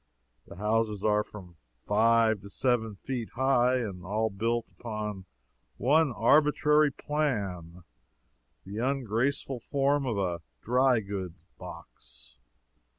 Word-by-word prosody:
The - - -11
houses 105 +1 0
are 105 -1 +3
from 90 -6 -12 0.3
five 110 0 +3
to 100 - -11
seven 115 -2 0
feet 120 +1 -5
high, 130 -1 +3
and 100 -8 -3
all 110 +4 -1
built 115 +4 -2
upon 105 -4 -5 0.5
one 150 +3 +3
arbitrary 150 +5 +4
plan 100 - -3 0.8
the 100 +3 -6
ungraceful 130 +1 -1
form 140 +3 0
of 115 -4 -1
a 90 -4 -1 0.2
dry 125 0 +3
goods 95 -4 -5 0.2
box. 85 -8 -12
110 Hz, 110 wpm, -29 LUFS, 100-130 Hz, 0.8 s, arbitrary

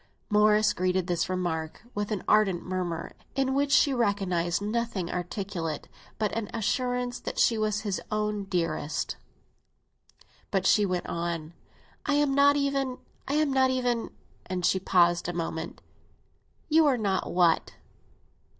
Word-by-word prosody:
Morris 210 0 +4
greeted 185 0 0
this 175 -1 -1
remark 175 -2 -3
with 205 0 -2
an 210 -4 -2
ardent 200 -5 +3
murmur, 180 -3 -3 0.2
in 270 -1 +1
which 280 +1 +1
she 285 -1 +5
recognised 195 -7 0
nothing 210 -4 -2
articulate 175 -3 -4 0.3
but 215 -2 -1
an 225 -3 -3
assurance 245 +2 -1
that - - -6
she 230 - +4
was 215 -1 0
his 205 -3 -2
own 210 -1 -1
dearest. 170 -5 -2 1.3
But 195 -2 0
she 210 -1 +4
went 180 -1 -2
on. 170 -1 -3 0.5
"I 290 - +1
am 290 -1 +2
not 285 +1 +5
even—I 275 0 -2
am 300 -2 +2
not 260 -1 +4
even—" 245 -3 0 0.4
And 180 -1 -2
she 190 - +3
paused 175 -2 +3
a - - -3
moment. 165 -1 -4 0.8
"You 320 0 +5
are 265 -3 +3
not 200 -4 -1
what?" 175 -2 +2
205 Hz, 140 wpm, -28 LUFS, 175-245 Hz, 1.3 s, she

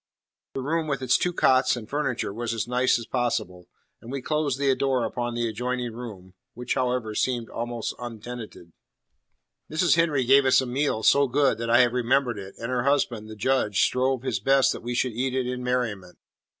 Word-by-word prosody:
The 135 - -2
room 160 +3 -1
with 140 -3 -2
its 130 +1 +3
two 180 - +1
cots 130 -6 +3
and 115 -3 -8
furniture 130 -7 -2
was 115 +1 -3
as 115 0 -2
nice 125 +1 +2
as 115 - -7
possible; 100 -8 -2 0.3
and 115 - -10
we 140 - -3
closed 150 -1 -1
the 135 -1 +2
door 130 -3 0
upon 120 -1 -3
the 120 0 0
adjoining 125 +1 -3
room, 105 -6 -9 0.2
which, 125 0 -2
however, 125 -4 -1
seemed 120 0 -1
also 120 0 -4
untenanted. 115 -7 -8 1.0
Mrs. 165 +2 +3
Henry 155 -5 +2
gave 135 +2 +5
us 130 - +5
a 130 - 0
meal 125 -3 -1
so 140 0 +5
good 135 -1 +2
that 115 0 -3
I 120 +2 +6
have 120 -1 +2
remembered 125 -2 +1
it, 95 0 -9
and 115 +2 -5
her 125 -1 0
husband, 120 -5 0
the 110 - -8
Judge, 105 -3 +1
strove 130 0 +1
his 135 - -1
best 135 -1 +3
that - - -8
we 120 +1 -4
should 125 0 0
eat 130 +3 -2
it 130 -1 0
in 125 0 -4
merriment. 115 -8 -2
125 Hz, 200 wpm, -25 LUFS, 115-135 Hz, 1.0 s, I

